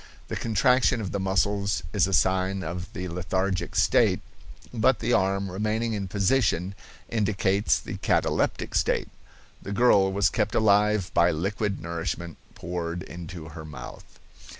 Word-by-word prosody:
The -, -, -3 dB
contraction 125 Hz, +3 st, +2 dB
of 100 Hz, -4 st, -4 dB
the 100 Hz, -, -2 dB
muscles 100 Hz, 0 st, 0 dB
is 100 Hz, -3 st, +3 dB
a -, -, -3 dB
sign 95 Hz, +1 st, +2 dB
of 90 Hz, +3 st, -5 dB
the 90 Hz, +1 st, -4 dB
lethargic 90 Hz, +2 st, -2 dB
state, -, -, +3 dB, 0.5 s
but 120 Hz, +2 st, +3 dB
the 120 Hz, +2 st, -1 dB
arm, 95 Hz, -1 st, +1 dB
remaining 110 Hz, +4 st, -1 dB
in 100 Hz, -2 st, -3 dB
position, 100 Hz, -2 st, +1 dB, 0.3 s
indicates 105 Hz, -2 st, +1 dB
the -, -, -7 dB
cataleptic -, -, 0 dB
state. -, -, +1 dB, 0.5 s
The 100 Hz, -, -7 dB
girl 100 Hz, -3 st, +4 dB
was 100 Hz, -1 st, +2 dB
kept -, -, -1 dB
alive 105 Hz, -2 st, +3 dB
by 85 Hz, 0 st, +4 dB
liquid 100 Hz, +5 st, -2 dB
nourishment 85 Hz, 0 st, -4 dB, 0.2 s
poured 85 Hz, 0 st, -4 dB
into 85 Hz, -3 st, -8 dB
her 80 Hz, 0 st, -9 dB
mouth. 70 Hz, -5 st, -11 dB
95 Hz, 140 wpm, -26 LUFS, 90-105 Hz, 0.5 s, girl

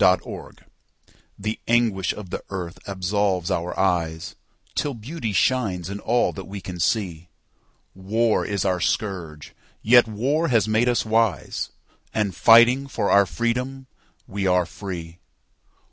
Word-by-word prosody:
Absolution 90 Hz, 0 st, 0 dB, 0.8 s
THE 105 Hz, +2 st, -3 dB
ANGUISH 115 Hz, -5 st, +2 dB
of 100 Hz, -4 st, -10 dB
the -, -, -4 dB
earth 90 Hz, -3 st, -5 dB
absolves 95 Hz, -1 st, 0 dB
our 85 Hz, +1 st, -2 dB
eyesTill 90 Hz, -, -3 dB
beauty 120 Hz, 0 st, -4 dB
shines 100 Hz, -6 st, 0 dB
in 100 Hz, -, -5 dB
all 120 Hz, +3 st, +1 dB
that 95 Hz, -, -8 dB
we 100 Hz, +1 st, -6 dB
can 90 Hz, -2 st, -8 dB
see. 85 Hz, -3 st, -1 dB, 0.6 s
War 110 Hz, +4 st, +1 dB
is 100 Hz, -1 st, -2 dB
our 90 Hz, -2 st, +1 dB
scourge; 75 Hz, 0 st, -3 dB, 0.3 s
yet 120 Hz, +1 st, +6 dB
war 135 Hz, +10 st, 0 dB
has 115 Hz, -, +2 dB
made 110 Hz, +3 st, +2 dB
us 120 Hz, -, +1 dB
wise, 110 Hz, -1 st, 0 dB, 0.5 s
And, 100 Hz, -4 st, 0 dB
fighting 120 Hz, +6 st, +6 dB
for 115 Hz, -6 st, -1 dB
our 100 Hz, -1 st, +5 dB
freedom, 125 Hz, +9 st, -2 dB, 0.4 s
we 100 Hz, 0 st, -2 dB
are 90 Hz, -1 st, +3 dB
free. 85 Hz, -3 st, -7 dB
100 Hz, 130 wpm, -23 LUFS, 90-115 Hz, 0.8 s, yet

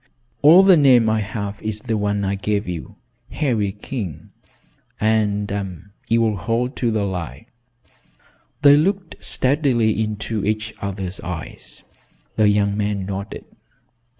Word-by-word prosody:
"All 165 Hz, +6 st, +8 dB
the 190 Hz, -2 st, +6 dB
name 125 Hz, -6 st, +5 dB
I 110 Hz, -, +1 dB
have 100 Hz, 0 st, -5 dB
is 110 Hz, -1 st, -4 dB
the 115 Hz, -1 st, -2 dB
one 105 Hz, -1 st, -1 dB
I 95 Hz, -, 0 dB
gave 100 Hz, +1 st, -2 dB
you, 85 Hz, -3 st, -6 dB, 0.3 s
Harry 115 Hz, -9 st, 0 dB
King." 105 Hz, -, -7 dB, 0.7 s
"And 100 Hz, -3 st, -1 dB, 0.2 s
you 115 Hz, +1 st, +2 dB
will 110 Hz, -2 st, 0 dB
hold 115 Hz, +6 st, -2 dB
to 120 Hz, -, 0 dB
the 110 Hz, -2 st, 0 dB
lie?" 85 Hz, -8 st, -5 dB, 1.2 s
They 145 Hz, 0 st, +8 dB
looked 185 Hz, +3 st, -1 dB
steadily 130 Hz, -6 st, +2 dB
into 110 Hz, 0 st, -3 dB
each 110 Hz, +1 st, -2 dB
other's 95 Hz, -2 st, -4 dB
eyes. 85 Hz, -2 st, -8 dB, 0.5 s
The 105 Hz, -1 st, +4 dB
young 100 Hz, -1 st, +2 dB
man 105 Hz, -2 st, -2 dB
nodded. 100 Hz, +1 st, -6 dB
105 Hz, 130 wpm, -21 LUFS, 100-115 Hz, 1.2 s, All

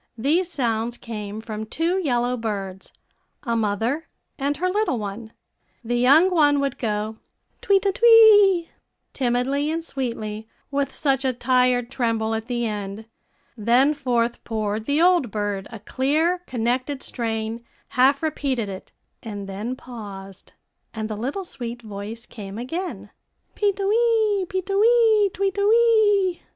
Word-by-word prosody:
These 330 Hz, +10 st, +1 dB
sounds 235 Hz, -4 st, -1 dB
came 210 Hz, -2 st, -6 dB
from 220 Hz, -1 st, -6 dB
two 335 Hz, +9 st, 0 dB
yellow 245 Hz, -6 st, 0 dB
birds, 195 Hz, -5 st, -5 dB, 0.5 s
a 235 Hz, -4 st, -1 dB
mother 225 Hz, +8 st, -1 dB, 0.3 s
and 280 Hz, +1 st, -1 dB
her 365 Hz, -, 0 dB
little 395 Hz, -, 0 dB
one. 215 Hz, +1 st, -6 dB, 0.5 s
The 240 Hz, +1 st, -2 dB
young 290 Hz, +10 st, +5 dB
one 290 Hz, -4 st, +4 dB
would 280 Hz, -2 st, -2 dB
go, 215 Hz, -1 st, -2 dB, 0.4 s
"Twe 400 Hz, -, +4 dB
te 390 Hz, +1 st, +1 dB
twee," 415 Hz, -5 st, +6 dB, 0.4 s
timidly 265 Hz, +3 st, 0 dB
and 325 Hz, +1 st, -2 dB
sweetly, 220 Hz, -6 st, -4 dB, 0.2 s
with 280 Hz, -1 st, -1 dB
such 270 Hz, -2 st, 0 dB
a 260 Hz, -1 st, +1 dB
tired 250 Hz, 0 st, +1 dB
tremble 225 Hz, -4 st, -1 dB
at 225 Hz, 0 st, -3 dB
the 240 Hz, -2 st, -1 dB
end; 205 Hz, 0 st, -5 dB, 0.5 s
then 245 Hz, +6 st, +3 dB
forth 245 Hz, -4 st, -1 dB
poured 215 Hz, -1 st, -3 dB
the 285 Hz, +2 st, +1 dB
old 345 Hz, -7 st, +4 dB
bird 205 Hz, -2 st, -3 dB
a 225 Hz, -, -7 dB
clear, 300 Hz, -, 0 dB
connected 255 Hz, +3 st, -2 dB
strain, 225 Hz, -1 st, -4 dB, 0.3 s
half 275 Hz, +3 st, +3 dB
repeated 265 Hz, -8 st, -1 dB
it, 190 Hz, -1 st, -9 dB, 0.3 s
and 205 Hz, -3 st, -7 dB
then 210 Hz, +6 st, -4 dB
paused; 200 Hz, -6 st, -10 dB, 0.4 s
and 220 Hz, 0 st, -4 dB
the -, -, -2 dB
little 275 Hz, -, -4 dB
sweet 240 Hz, -6 st, -7 dB
voice 215 Hz, +2 st, -7 dB
came 200 Hz, -2 st, -9 dB
again, 330 Hz, +10 st, -5 dB, 0.4 s
"Pee 410 Hz, -1 st, +1 dB
te 395 Hz, 0 st, -5 dB
wee 435 Hz, -2 st, +2 dB
pee 375 Hz, -1 st, -2 dB
te 395 Hz, +2 st, -4 dB
wee 440 Hz, -1 st, +4 dB
twee 390 Hz, +1 st, 0 dB
te 400 Hz, +1 st, -2 dB
wee." 420 Hz, -4 st, +3 dB
250 Hz, 145 wpm, -23 LUFS, 220-340 Hz, 0.5 s, twee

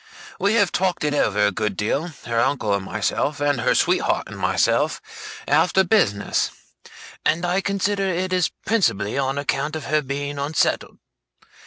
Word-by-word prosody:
We 200 Hz, +3 st, +2 dB
have 200 Hz, -5 st, +3 dB
talked 185 Hz, -3 st, 0 dB
it 150 Hz, -1 st, +1 dB
over 105 Hz, -7 st, +2 dB
a 105 Hz, -, +2 dB
good 105 Hz, -1 st, -2 dB
deal, 140 Hz, +10 st, -1 dB, 0.2 s
her 115 Hz, -1 st, 0 dB
uncle 125 Hz, -5 st, +1 dB
and 100 Hz, -1 st, -1 dB
myself, 145 Hz, +9 st, -1 dB
and 145 Hz, -4 st, +1 dB
her -, -, +2 dB
sweetheart -, -, +2 dB
and -, -, -9 dB
myself, -, -, +1 dB, 0.5 s
after 165 Hz, +6 st, +3 dB
business; 125 Hz, -, +1 dB, 0.7 s
and 170 Hz, +2 st, +1 dB
I 180 Hz, +2 st, +1 dB
consider 200 Hz, 0 st, 0 dB
it 185 Hz, +1 st, -1 dB
is 180 Hz, -2 st, +2 dB, 0.2 s
principally 105 Hz, -, +1 dB
on 135 Hz, 0 st, -1 dB
account 145 Hz, +1 st, -1 dB
of 155 Hz, -, -5 dB
her 155 Hz, 0 st, +1 dB
being 140 Hz, +1 st, -4 dB
unsettled. 145 Hz, +2 st, 0 dB
145 Hz, 160 wpm, -22 LUFS, 120-185 Hz, 0.7 s, have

